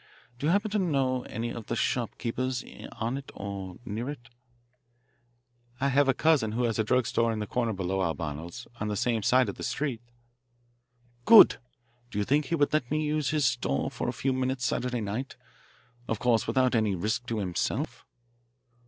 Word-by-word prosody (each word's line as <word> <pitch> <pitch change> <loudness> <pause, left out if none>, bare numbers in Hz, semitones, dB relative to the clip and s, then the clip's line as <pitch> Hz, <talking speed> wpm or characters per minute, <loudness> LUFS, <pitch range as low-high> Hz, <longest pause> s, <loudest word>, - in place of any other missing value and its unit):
Do 145 - -1
you - - +4
happen 205 +3 +1
to 210 - +1
know 135 -8 +1
any 115 +1 -4
of 115 -3 -7
the - - -2
shopkeepers 125 0 -1 0.3
on 115 +4 -2
it 135 - -12
or 95 -2 -6
near 115 +4 -4
it?" 120 -6 -8 1.5
"I 140 +1 +2
have 140 +1 +3
a 135 - +3
cousin 145 -9 +3
who 120 +2 0
has 115 -2 0
a - - +4
drug 125 +3 +2
store 115 0 +1
on 110 - -2
the 105 - -2
corner 115 +2 -1
below 95 -1 -2
Albano's, 80 0 -4
on 105 - -2
the 105 - -1
same 115 +2 0
side 125 +4 +4
of 100 - -5
the - - -7
street." 135 -6 -2 1.2
"Good! 230 - +9 0.5
Do 110 - -6
you 105 - +2
think 145 +5 +2
he 170 - 0
would 145 -2 +1
let 135 -6 +1
me 155 +1 0
use 150 -2 0
his 150 -2 +1
store 70 - 0
for - - -3
a - - -2
few 135 0 -1
minutes 130 -1 -1
Saturday 125 -1 -1
night 110 +6 -4 0.7
of 115 - -1
course 115 0 +2
without 125 +2 +2
any 110 -4 +2
risk 110 +7 -2
to 115 - -2
himself!" 90 -4 -2
120 Hz, 190 wpm, -28 LUFS, 105-135 Hz, 1.5 s, Good